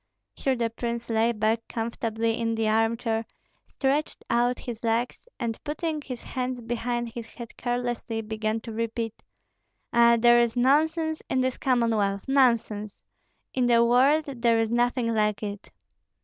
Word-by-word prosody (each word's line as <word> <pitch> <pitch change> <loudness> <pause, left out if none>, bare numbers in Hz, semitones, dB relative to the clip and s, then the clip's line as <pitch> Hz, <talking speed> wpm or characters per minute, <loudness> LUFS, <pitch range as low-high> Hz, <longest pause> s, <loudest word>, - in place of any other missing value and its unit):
Here 265 -1 0
the 230 -2 -1
prince 235 0 -4
lay 225 +1 +3
back 220 +1 0
comfortably 225 0 -2
in 230 -1 0
the 225 -1 0
armchair, 225 +1 +1 0.4
stretched 285 +2 -1
out 245 +1 +2
his 240 -3 -7
legs, 230 - -1
and 230 -3 -3
putting 310 +1 -3
his 255 -4 -7
hands 255 -1 -3
behind 240 0 -2
his 230 0 -7
head 235 -1 -10
carelessly, 240 -2 -2
began 220 0 -2
to 230 - -8
repeat, 230 0 -3 0.7
"Ah, 235 0 +6
there 240 +1 +6
is 235 0 0
nonsense 315 +5 +2
in 260 - +1
this 255 -1 -1
Commonwealth, 225 -6 +1
nonsense! 230 -6 +1 0.5
In 250 -2 +1
the 235 -1 +5
world 270 +6 +4
there 235 -5 +1
is 225 0 0
nothing 240 0 +1
like 210 -1 +1
it!" 205 -1 -6
235 Hz, 150 wpm, -26 LUFS, 225-250 Hz, 0.7 s, Ah